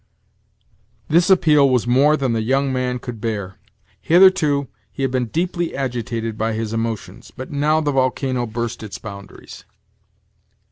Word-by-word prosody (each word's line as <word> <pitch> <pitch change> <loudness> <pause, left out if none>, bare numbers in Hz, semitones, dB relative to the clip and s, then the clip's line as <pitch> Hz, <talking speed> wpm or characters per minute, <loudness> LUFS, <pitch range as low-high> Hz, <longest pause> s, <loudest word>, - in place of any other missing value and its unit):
This 170 +4 +3
appeal 155 -7 +5
was 125 -3 +1
more 140 +5 +4
than 130 -4 -1
the 115 - 0
young 135 +4 0
man 125 -1 -1
could 120 -3 -8
bear. 100 -4 -4 0.4
Hitherto 160 -6 +4 0.2
he 135 - -5
had 135 - 0
been 125 -2 -1
deeply 175 +4 -2
agitated 115 -4 -3
by 110 +1 0
his 110 0 -3
emotions; 115 -2 -4
but 130 - -7
now 150 +2 +1
the 145 -1 0
volcano 130 -2 0
burst 115 +1 -4
its 105 -3 -7
boundaries. 100 -2 -11
130 Hz, 145 wpm, -20 LUFS, 115-145 Hz, 0.4 s, appeal